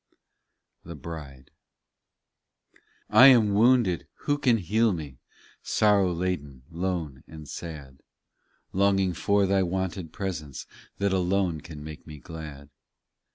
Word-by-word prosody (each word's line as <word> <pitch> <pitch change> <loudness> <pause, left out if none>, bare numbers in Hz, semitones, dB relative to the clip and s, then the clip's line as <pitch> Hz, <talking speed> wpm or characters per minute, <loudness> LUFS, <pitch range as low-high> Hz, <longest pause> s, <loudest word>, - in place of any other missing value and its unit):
THE 85 0 -9
BRIDE 70 -4 -9 1.6
1 125 +6 +9
am 110 -6 +5
wounded; 110 - +3
who 145 0 0
can 125 -5 +3
heal 110 +4 +2
me? 75 -7 -7 0.4
Sorrow 100 -3 +3
laden, 80 -7 -3
lone, 85 -6 -3
and 80 -2 -11
sad; 70 -6 -8 0.7
Longing 95 -1 +2
for 100 +4 +2
Thy 95 0 +2
wonted 95 -2 -3
presence, 80 -8 -5 0.3
That 100 -1 0
alone 90 -3 0
can 75 -2 -10
make 75 +1 -10
me 75 -1 -9
glad. 75 -2 -10
90 Hz, 110 wpm, -26 LUFS, 75-100 Hz, 1.6 s, 1